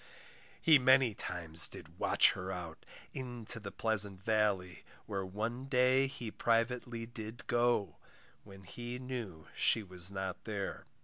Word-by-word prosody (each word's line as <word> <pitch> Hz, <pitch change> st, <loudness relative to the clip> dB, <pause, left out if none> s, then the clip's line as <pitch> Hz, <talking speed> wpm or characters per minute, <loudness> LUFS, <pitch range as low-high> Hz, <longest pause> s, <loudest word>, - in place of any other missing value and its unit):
He 155 Hz, -4 st, +6 dB
many 130 Hz, -2 st, +4 dB
times 85 Hz, -5 st, +4 dB
did -, -, -12 dB
watch -, -, +6 dB
her 95 Hz, +1 st, -6 dB
out, 85 Hz, -4 st, -8 dB, 0.3 s
Into 120 Hz, -3 st, -6 dB
the 100 Hz, -2 st, -8 dB
pleasant 100 Hz, -4 st, 0 dB
valley, 100 Hz, -6 st, 0 dB, 0.2 s
where 100 Hz, -2 st, -4 dB
One 110 Hz, +7 st, -4 dB
day 130 Hz, 0 st, +3 dB
he 125 Hz, -5 st, -7 dB
privately 115 Hz, +1 st, -1 dB
did 115 Hz, 0 st, -9 dB
go, 120 Hz, -4 st, 0 dB, 0.5 s
When 95 Hz, -1 st, -14 dB
he 120 Hz, +7 st, -7 dB
knew 120 Hz, -11 st, -7 dB
she 110 Hz, -, +3 dB
was 90 Hz, -2 st, +3 dB
not 95 Hz, -2 st, -5 dB
there. 100 Hz, -3 st, -5 dB
110 Hz, 135 wpm, -33 LUFS, 95-120 Hz, 0.5 s, He